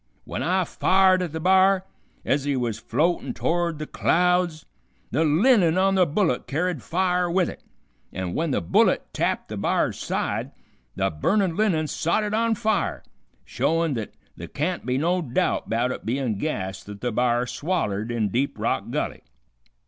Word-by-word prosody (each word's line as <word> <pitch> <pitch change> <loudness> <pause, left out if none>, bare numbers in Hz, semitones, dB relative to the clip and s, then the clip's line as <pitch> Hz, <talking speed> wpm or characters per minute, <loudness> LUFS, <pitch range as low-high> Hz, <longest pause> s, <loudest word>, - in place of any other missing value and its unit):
Wen - - -4
I 185 +2 +1
fired 185 +2 +3
at 175 -4 -3
the 160 - -4
b'ar, 190 +2 +4 0.4
ez 140 0 +1
he 145 -1 0
was 120 -4 -2
floatin' 160 +8 0
to'ard 170 -1 0
the 155 - -5
clouds, 180 -1 +1 0.5
the 150 +7 +2
linen 175 - +4
on 195 +1 +3
the 185 -2 +4
bullet 160 -5 0
carried 160 0 -1
fire 180 +2 0
with 180 0 +2
it, - - -8 0.5
an' 95 -1 -4
w'en 160 - -1
the 135 - 0
bullet 85 - +3
tapped - - -1
the - - -5
b'ar's - - 0
side - - -2 0.4
the - - 0
burnin' 180 - +1
linen 180 -7 +1
sot 170 +7 0
it 210 0 -3
on 230 +1 +2
fire, 215 +1 -1 0.4
showin' 165 -2 0
th't 110 -4 -4 0.3
th' - - -8
can't - - -2
be 125 +1 +1
no 175 +5 +1
doubt 130 -6 -1
'bout 120 +3 +1
it - - -6
bein' 120 -3 -1
gas 95 -10 -3
th't 100 0 -10
the 125 - -1
b'ar 120 +1 +1
swallered 120 - -2
in 110 -3 0
Deep 130 +7 -1
Rock - - -1
Gulley. - - -3
160 Hz, 170 wpm, -24 LUFS, 125-185 Hz, 0.5 s, b'ar